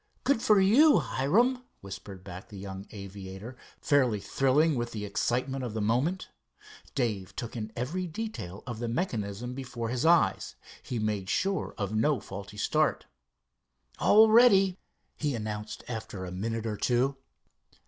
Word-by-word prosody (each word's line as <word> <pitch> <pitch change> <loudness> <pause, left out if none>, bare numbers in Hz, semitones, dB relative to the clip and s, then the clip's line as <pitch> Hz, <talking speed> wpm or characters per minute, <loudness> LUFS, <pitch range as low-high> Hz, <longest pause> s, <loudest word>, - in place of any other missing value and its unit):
"Good 275 -5 +2
for 210 -3 +5
you, 255 +11 +6
Hiram!" 240 - +2 0.2
whispered 95 -1 -9
back 95 -1 -9
the 105 - -10
young 95 0 -7
aviator, 100 +3 -8 0.2
fairly 130 -7 +2
thrilling 135 +9 +2
with 120 -2 -3
the 105 -2 -4
excitement 125 +6 -1
of 115 -3 -4
the - - -1
moment. 125 - 0 0.7
Dave 105 -7 -2
took 120 0 -5
in 110 -2 -4
every 165 +10 -2
detail 160 - -6
of 120 -3 -5
the 120 - -2
mechanism 115 - -2
before 125 -3 -5
his 125 0 -1
eyes. 170 +1 +3 0.3
He 125 - -4
made 105 -3 -2
sure 195 +1 -1
of 100 -2 -3
no 135 +6 +2
faulty 100 +1 -9
start. - - +1 0.9
"All 220 +1 +7
ready," 195 -5 +6 0.4
he 145 -4 -1
announced 105 -1 -5
after 110 -5 -5
a 90 - -6
minute 115 +4 -3
or 105 -2 -2
two. 130 +4 +1
120 Hz, 150 wpm, -29 LUFS, 105-155 Hz, 0.9 s, All